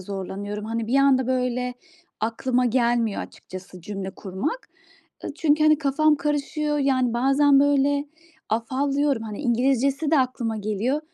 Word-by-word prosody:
zorlanıyorum. 200 +2 -5
Hani, 225 0 -3
bir 245 +4 +1
anda, 270 -2 +4
böyle, 250 -1 -1 0.5
aklıma 245 +3 0
gelmiyor 235 -3 +1
açıkçası 185 0 -11
cümle 195 +1 -5
kurmak, 200 - -5 0.6
ııı, - - -5
çünkü, 305 -2 +2
hani, 310 -1 +5
kafam 305 +1 +2
karışıyor, 295 +1 -1
yani, 260 -4 +1
bazen, 275 +3 +4
böyle, 285 0 +2 0.4
afallıyorum, 275 +3 0
hani, 215 -2 -6
İngilizcesi 270 +3 +1
de 315 - +4
aklıma 250 -4 -1
geliyor. 215 +7 -1
255 Hz, 130 wpm, -24 LUFS, 225-285 Hz, 0.6 s, hani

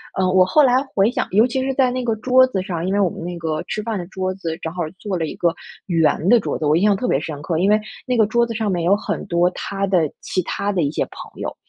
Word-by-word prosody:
呃， 190 -1 +1
我 185 -1 +5
后 300 +11 +4
来 255 0 +4
回 200 +2 +4
想 - - -2
尤 215 +4 +5
其 260 +1 -1
是 270 0 -1
在 260 -1 +3
那 255 0 -2
个 230 -2 0
桌 255 +3 +5
子 195 -7 -2
上， 175 -3 -4
因 195 - 0
为 205 - +1
我 190 - +3
们 165 - -8
那 175 0 -5
个 160 -2 -2
吃 215 - -4
饭 225 -1 -2
的 175 - -5
桌 185 0 -3
子， 165 -4 -4
正 160 - -4
好 175 -1 -2 0.2
坐 200 -3 -3
了 165 - -1
1 - - -6
个 170 - +2 0.4
圆 165 -1 +1
的 240 - +6
桌 - - -3
子， 155 - -2
我 150 +1 +3
印 180 - +1
象 205 -1 +4
特 245 +6 -2
别 135 - +2
深 150 -1 -6
刻， 160 +2 -2
因 185 +4 +2
为 210 +1 +4 0.3
那 255 - 0
个 220 -2 +4
桌 235 +2 +2
子 235 - -5
上 220 -2 -1
面 175 -2 -1
有 185 +4 +4
很 205 - -4
多 175 -1 +2
她 195 +1 -3
的 175 -5 +2
其 185 - -1
他 200 +3 -2
的 185 -4 0
一 140 - 0
些 - - -1
朋 - - -11
友， - - -4
195 Hz, 320 characters per minute, -20 LUFS, 170-225 Hz, 0.4 s, 的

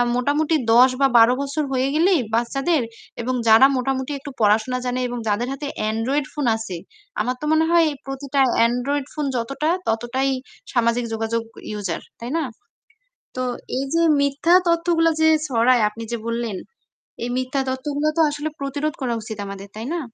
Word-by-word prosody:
মোটামুটি 290 +5 +1 0.2
১০ 250 +3 +7
বা 275 - +6
১২ 230 +2 +7
বছর 280 +2 -2
হয়ে 260 0 +1
গেলেই 345 +2 +4 0.2
বাচ্চাদের 275 +7 +1 0.4
এবং 255 +2 -2
যারা 225 +4 +8
মোটামুটি 265 +2 -2
একটু 280 +1 -8
পড়াশোনা 220 +4 +2
জানে 250 0 -1
এবং 245 0 -5
যাদের 215 +4 0
হাতে 285 +1 -5 0.2
Android 260 +6 -1
ফোন 295 -2 -2
আছে 220 -5 -6 0.5
আমার 250 +4 -1
তো - - -3
মনে 315 +1 +3
হয় 340 -1 +5 0.2
প্রতিটা 275 +1 -3 0.3
Android 265 +4 -1
ফোন 300 -2 -2
যতটা, 275 +6 -1 0.2
ততটাই 240 +4 0 0.4
সামাজিক 240 -1 +1
যোগাযোগ 225 +1 -1 0.4
user 185 -5 -3 0.2
তাই 235 +2 -6
না? 330 - 0 0.9
তো 255 - -1 0.4
এই 270 - -1
যে 335 - +3 0.2
মিথ্যা 280 +5 +2
তথ্যগুলো 335 -1 +3
যে 315 - +5 0.2
ছড়ায় 245 -2 +3
আপনি 220 +2 -9
যে 235 - -1
বললেন 230 -3 -2 0.7
এই 240 - -2
মিথ্যা 255 +2 -1
তথ্যগুলো 285 +3 -2
তো - - +5
আসলে 295 +1 -3
প্রতিরোধ 285 +2 -2
করা 250 -3 -1
উচিত 220 0 -7
আমাদের, 200 0 -8
তাই 220 +3 -6
না? 345 - -1
260 Hz, 165 wpm, -22 LUFS, 235-290 Hz, 0.9 s, যারা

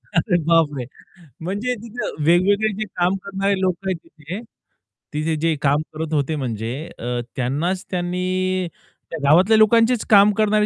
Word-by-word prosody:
अरे 175 +2 +2
बापरे! 150 -6 +2 0.6
म्हणजे 205 +9 -2
तिथं 230 -9 -5
वेगवेगळे 200 +6 +3
जे 215 - -1
काम 180 +2 +2
करणारे 195 0 0
लोकं 185 0 -1
आहेत 185 - -1
तिथे 160 +7 -8 0.7
तिथे 155 +1 -1
जे 165 -1 +2
काम 145 +1 +2
करत 160 0 -4
होते 150 +1 0
म्हणजे 115 -5 -3 0.3
अ, 120 - -7 0.3
त्यांनाच 150 +9 -1
त्यांनी 185 +1 -1 0.6
गावातल्या 180 +10 +5
लोकांचेच 225 +2 +4
काम 205 0 +7
करणारे 215 0 +3
180 Hz, 135 wpm, -21 LUFS, 155-200 Hz, 0.7 s, काम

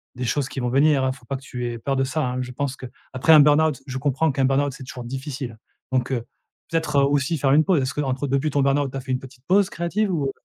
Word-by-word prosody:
des 125 - -4
choses 130 +3 0
qui 135 - -6
vont 125 - -1
venir, 140 +2 +3
hein. 130 - +2
Il - - -14
faut 125 - -20
pas 135 - -3
que 135 - -7
tu 125 -2 -6
aies 120 - -5
peur 135 +4 -1
de 135 - +2
ça, 150 +4 -2
hein. 125 0 -2
Je 125 0 -5
pense 135 +1 -3
qu'après 130 +3 0
un 155 - +9
burn-out 150 -1 +3
je 130 -1 -4
comprends 145 +4 +1
qu'un 135 0 +1
burn-out 135 +1 +2
c'est 130 - -10
toujours 125 -1 -8
difficile 130 -1 -6 0.3
donc 130 0 0
heu, 120 -3 -2 0.4
peut-être, 160 -4 +1
aussi 140 +3 +1
faire 135 -1 +1
une 155 +2 +5
pause. 175 -4 +2
Est-ce 130 +2 -2
qu'entre 140 -1 -1
depuis 140 +3 +1
ton 140 - +1
burn-out 140 0 +2
tu 135 - -5
as - - -4
fait 130 0 -6
une 130 - 0
petite 130 -1 -14
pause 195 +1 +4
créative 190 +5 -1
ou 150 -5 0
heu - - -2
135 Hz, 280 wpm, -23 LUFS, 130-145 Hz, 0.4 s, un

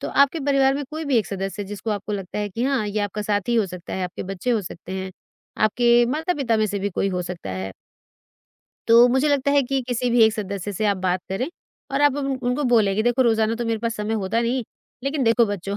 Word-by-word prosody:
तो - - -4
आपके 280 +3 +3
परिवार 270 -1 +3
में 285 0 -3
कोई 315 +1 -5
भी 280 -4 +1
एक 215 - -1
सदस्य 195 +1 -4
जिसको 205 +3 -5
आपको 210 0 -3
लगता 195 -1 -4
है 210 0 -1
कि 225 +5 -4
हाँ, 265 -6 +1
ये 205 +1 -2
आपका 205 +1 -3
साथी 205 +3 0
हो 225 -3 +3
सकता 180 -1 -8
है, 190 - -2
आपके 180 - -6
बच्चे 195 +6 -3
हो 225 -3 +2
सकते 175 +1 -8
हैं, 190 0 -4 0.5
आपके 240 +2 +4
माता-पिता 280 -3 0
में 215 0 +2
से 205 0 -3
भी 200 +1 -2
कोई 195 +2 0
हो 180 -1 -2
सकता 170 - -6
है। 95 +1 -4 1.2
तो 235 +1 +8
मुझे 265 +4 +2
लगता 280 -1 +2
है 280 -1 +4
कि 270 +1 -1
किसी 245 0 0
भी 235 -1 +5
एक 220 - +4
सदस्य 200 -2 -4
से 215 +3 -2
आप 200 -1 +2
बात 185 0 0
करें 215 - -2 0.4
और 275 +1 0
आप 290 -1 +4
उन 285 -1 -2 0.2
उनको 250 +4 0
बोलें 205 -4 +4
कि 215 - +2
देखो 240 +3 +3
रोज़ाना 225 -1 +2
तो 240 +1 -3
मेरे 225 -1 0
पास 230 +1 -2
समय 210 +1 -2
होता 215 +2 0
नहीं। 240 +2 0 0.4
लेकिन 275 0 -1
देखो 230 +1 +4
बच्चों 200 0 -4
220 Hz, 245 wpm, -23 LUFS, 200-255 Hz, 1.2 s, तो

